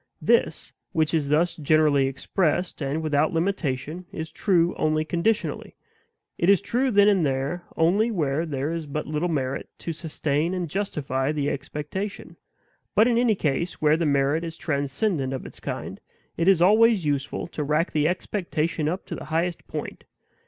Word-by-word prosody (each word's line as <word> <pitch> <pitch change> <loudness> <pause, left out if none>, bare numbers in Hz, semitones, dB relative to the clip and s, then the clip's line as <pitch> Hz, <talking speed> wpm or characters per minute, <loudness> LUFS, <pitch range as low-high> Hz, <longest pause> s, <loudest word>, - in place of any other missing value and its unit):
This, - - +1 0.2
which 160 0 +1
is 150 -4 +1
thus 170 +3 +2
generally 150 -3 +3
expressed, 165 +6 -1
and 145 +3 -2
without 155 +1 +1
limitation, 165 -2 -2
is 160 0 -6
true 175 -1 +2
only 155 0 +1
conditionally; 195 +7 -1 0.6
it 170 - +2
is 200 -2 +6
true 250 +6 0
then 205 -3 +5
and 195 -4 +4
there 140 +5 -1
only 190 +8 +3
where 160 -5 -1
there 140 0 -2
is 165 -2 -4
but 150 +2 -3
little 155 +3 -1
merit 135 -4 -2
to 165 - -4
sustain 155 +1 -1
and 180 -2 -2
justify 145 -8 -1
the 145 -2 -1
expectation. 150 +8 -5 0.6
But 215 +3 +6
in 235 -1 +3
any 240 -3 +3
case 165 +1 -1
where 150 0 +4
the 165 -1 0
merit 140 +3 +2
is 165 -1 -6
transcendent 140 0 -1
of 130 - -5
its - - -10
kind, - - -5 0.4
it 165 - 0
is 185 -3 +5
always 215 -1 +5
useful 145 -1 -1
to 150 - -3
rack 150 +4 +1
the 150 0 +2
expectation 165 -4 -1
up 180 +4 -4
to - - -6
the - - -6
highest 165 +3 -2
point. - - -6
160 Hz, 165 wpm, -25 LUFS, 145-180 Hz, 0.6 s, is